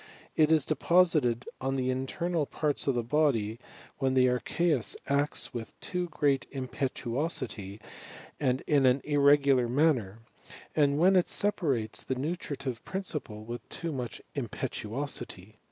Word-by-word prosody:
It 155 0 +4
i 160 - +7
deposited 155 -7 +3 0.2
on 135 0 -1
the 130 -1 0
internal 150 +5 -1
parts 150 -2 -1
of 135 - +2
the 120 - 0
bodv 120 -5 +1 0.4
when 135 -2 +1
tin 130 - +5
aichEBUB 130 +2 +1
acts 140 +1 0
with 115 -2 -7
too 180 -1 -3
great 145 -4 +1
impetuosity 130 - -3 0.6
and 130 -2 +1
in 140 -3 +3
an 130 +2 +3
irrs 145 -1 +4
gular 130 -4 +3
manner, 125 -7 +2 0.6
and 145 -2 +3
when 185 +4 +5
it 180 - +3
separates 140 - +1
the 130 - -2
nutritiv^ 140 -3 -4
principle 150 - -5
with 120 +1 -7
too 170 -1 -3
much 125 -5 -5
impetuosity. 110 -4 -4
135 Hz, 135 wpm, -29 LUFS, 120-155 Hz, 0.6 s, i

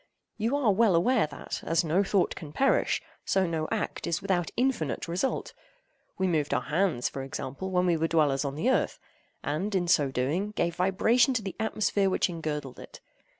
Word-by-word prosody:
You 230 +6 +1
are 250 -7 +3
well 205 -2 +4
aware 220 +2 +3
that, - - -6
as 165 +1 +1
no 170 +5 +2
thought 195 -2 +1
can 150 -3 -8
perish, 270 - +2 0.2
so 190 -1 +2
no 160 -2 -2
act - - -2
is 170 0 0
without 185 -4 0
infinite 245 - 0
result. 180 +10 -2 0.6
We 190 - 0
moved 155 -5 +1
our 125 - 0
hands, 160 -5 0
for 135 - -5
example, 135 +5 -5
when 180 -1 +1
we 175 -2 +3
were 165 +1 +1
dwellers 150 -4 +2
on 140 -1 -3
the 235 - +1
earth, - - +1 0.5
and, 190 +8 -2
in 175 -2 +1
so 145 -5 +3
doing, 150 +12 -1
gave 170 -4 -1
vibration 225 +8 +3
to 225 - 0
the 195 - -5
atmosphere 210 -2 +1
which 185 - +1
engirdled 150 -5 -4
it. - - -11
175 Hz, 190 wpm, -28 LUFS, 155-200 Hz, 0.6 s, well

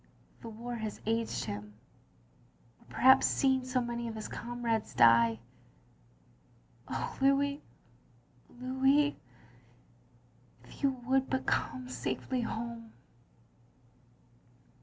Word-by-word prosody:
The 230 - -7
war 235 +2 -7
has 220 -2 -5
aged 225 +1 -1
him 105 0 -6 0.6
— 115 - -33
or - - -22
perhaps 265 +1 +6
seeing 265 -1 +2
so 255 0 0
many 235 0 -3
of 225 - -5
his 215 - -5
comrades 235 -2 -3
die. 115 -1 +6 1.5
Oh, - - -4
Louis, 280 +1 +2 0.9
Louis 265 +4 +2 0.7
— 120 0 -31
^if - - -15
you 280 - +4 0.2
would 265 +1 +2
but 265 0 -1
come 130 -1 -1
safely 130 - -3
home. 230 0 -5
230 Hz, 105 wpm, -31 LUFS, -, 1.5 s, perhaps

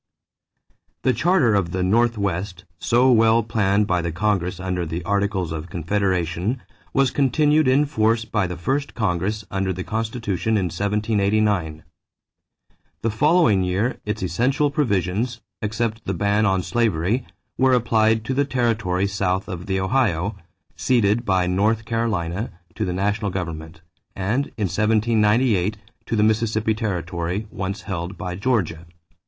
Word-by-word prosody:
This 130 - +2
Charter 170 - +3
of 90 -4 0
the 95 0 0
Northwest, 100 -4 0
so 125 +2 +3
well 115 0 +4
planned 105 -2 +1
by 90 -2 +1
the 85 0 -2
Congress 90 -1 -1
under 90 -1 -2
the 85 +1 -4
Articles 100 -2 0
of 80 +1 -5
Confederation, 90 - -1 0.3
was 135 -2 +2
continued 150 +3 +3
in 135 +3 +4
force 115 -4 +1
by 105 -3 0
the 90 0 -6
first 140 - -2
Congress 105 0 -1
under 95 -1 -1
the 95 0 -4
Constitution 110 -1 -1
in 90 -4 -1
1789. 100 -4 0 1.2
The 115 - +1
following 150 - +3
year 95 +7 0
its 105 -1 -3
essential 130 - +1
provisions, 115 - 0 0.2
except 110 +1 -2
the 95 - -2
ban 100 +3 +2
on 95 -2 +1
slavery, 115 +1 0 0.4
were 130 0 +4
applied 110 -2 +2
to 130 - -1
the 140 +2 +2
territory 115 -8 0
south 95 -1 -1
of 90 -2 -6
the 95 -1 0
Ohio, 100 -3 0 0.4
ceded 115 -2 +2
by 95 -2 +2
North 105 +5 +1
Carolina 110 -3 -1 0.2
to 110 - -2
the 90 - -2
national 100 +3 0
government, 80 -3 -6 0.3
and 105 +9 0
in 105 - 0
1798 105 0 +2 0.3
to - - -1
the 105 - +3
Mississippi 110 0 +1
territory, 90 -2 -3
once 100 -1 -4
held 90 -1 -5
by 90 -3 -4
Georgia. 90 -6 -1
105 Hz, 140 wpm, -22 LUFS, 90-115 Hz, 1.2 s, well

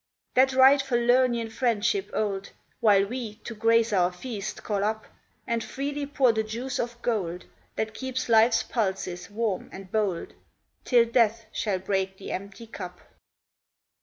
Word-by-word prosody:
That 265 +1 +4
right 265 +2 +7
Falernian 240 -2 +2
friendship 240 - 0
old 200 -2 -2 0.3
Will 200 -3 +5
we, 230 -1 -5
to 235 - -6
grace 230 0 +3
our 180 -2 +3
feast, 205 +2 -6
call 200 -2 -1
up, 220 +1 -1 0.4
And 235 -2 -1
freely 285 +1 -4
pour 275 -4 +3
the 220 - +1
juice 235 +4 -4
of 235 0 -3
gold, 185 -7 -2 0.3
That 220 0 -2
keeps 260 0 -3
life's 225 0 +5
pulses 190 -5 -2
warm 210 -2 -2
and 190 -1 -10
bold, 205 -6 -1 0.5
Till 240 -2 +5
Death 230 -1 +2
shall 205 -4 -1
break 190 0 -2
the 195 - -7
empty 200 +4 -6
cup. 180 -5 -8
225 Hz, 145 wpm, -26 LUFS, 200-245 Hz, 0.5 s, right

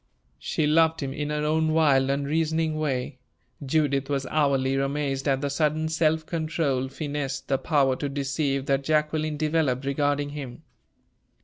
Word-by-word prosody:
She 155 - -1
loved 160 +1 +3
him 135 -1 -3
in 145 +1 -3
her 150 0 -1
own 155 +1 +1
wild, 140 -4 +3
unreasoning 155 +3 0
way. 130 -3 -2 0.4
Judith 140 -1 0
was 140 -1 -1
hourly 140 -3 +2
amazed 135 0 -1
at 135 -1 +1
the 145 - -1
sudden 155 +2 0
self 160 0 +1
control, 155 -6 -1
finesse, 140 -1 -3
the 135 -1 -1
power 140 -4 +2
to 145 - -3
deceive, 135 0 -1
that 135 0 +1
Jacqueline 155 +1 0
developed 150 -4 0
regarding 145 +1 0
him. 135 -4 -8
145 Hz, 145 wpm, -26 LUFS, 135-155 Hz, 0.4 s, loved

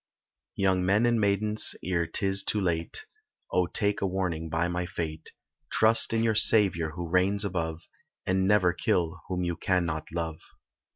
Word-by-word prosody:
Young 95 -2 +1
men 100 +5 +2
and 120 -2 +2
maidens 105 +1 +2
ere 85 -2 -1
'tis 95 +4 +1
too 105 - 0
late, 85 - -2 0.5
Oh 90 -1 +1
take 105 +3 0
a 100 - +1
warning 90 -4 -3
by 80 +2 0
my 90 0 -3
fate, 80 -3 -6 0.4
Trust 110 +1 +4
in 115 0 +1
your 115 -1 +2
Saviour 95 -7 +3
who 85 0 -5
reigns 95 +4 +1
above, 85 -4 -3 0.4
And 95 0 +1
never 95 -4 +3
kill 85 -2 -1
whom 90 0 -2
you 85 -1 -2
cannot 85 -6 -2
love. 80 -2 -4
90 Hz, 160 wpm, -27 LUFS, 85-100 Hz, 0.5 s, Trust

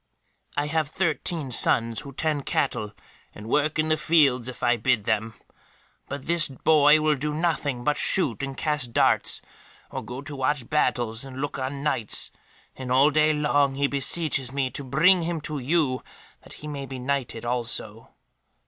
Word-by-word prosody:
"I 145 - +1
have 155 0 0
thirteen 160 -3 -1
sons 115 -1 +4
who 140 - -9
tend 150 0 -2
cattle, 105 -1 -1 0.4
and 105 - -10
work 150 +5 +1
in 155 0 +1
the 155 - +3
fields 145 -6 +3
if 130 - -8
I 120 0 +4
bid 120 -1 +1
them; 110 +1 -1 0.7
but 140 -1 -6
this 170 -1 +2
boy 150 +2 +4
will 155 0 +2
do 150 +2 -3
nothing 150 -6 -1
but 150 +2 +1
shoot 140 - 0
and 135 -1 -5
cast 145 -6 -2
darts, - - +2 0.5
or - - -5
go 125 +3 -7
to 145 0 -7
watch 135 -2 -1
battles 120 -6 0
and 135 -1 -8
look 145 0 -3
on 135 +2 -4
Knights, 120 -8 0 0.4
and 130 -1 -6
all 135 +4 +5
day 155 +1 +3
long 145 -2 +1
he 140 +1 +1
beseeches 140 -1 +1
me 135 -2 -1
to 140 - -6
bring 165 +8 +4
him 170 0 -2
to 150 -1 -4
you, 135 -1 0 0.4
that - - -13
he 150 - -10
may 140 -2 -5
be 130 - -7
knighted 125 -3 -3
also." 115 -2 -3
140 Hz, 175 wpm, -25 LUFS, 125-150 Hz, 0.7 s, all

